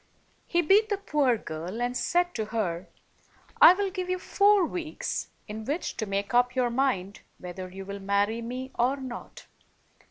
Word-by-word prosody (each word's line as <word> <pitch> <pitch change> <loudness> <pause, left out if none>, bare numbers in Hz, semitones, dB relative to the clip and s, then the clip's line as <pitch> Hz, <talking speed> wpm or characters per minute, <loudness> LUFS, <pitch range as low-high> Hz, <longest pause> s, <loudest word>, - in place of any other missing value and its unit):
He 345 -1 +2
beat 415 +6 +4
the 405 - 0
poor 295 - +1
girl, 170 +5 -6
and 245 +1 -1
said 350 +6 +1
to 220 - -2
her, 195 -6 -3 0.7
"I 360 - +10
will 395 0 -1
give 365 -1 -4
you 365 - +1
four 400 +1 +4
weeks 325 -1 -4 0.2
in 215 +1 -6
which 295 +9 -3
to 220 - -2
make 200 +3 -2
up 245 +1 +3
your 250 -2 +1
mind 235 -7 0 0.2
whether 185 +1 -7
you 190 +1 -8
will 200 +1 -6
marry 200 +3 0
me 255 +3 -5
or 250 +3 +3
not. 260 -3 -8
245 Hz, 170 wpm, -27 LUFS, -, 0.7 s, I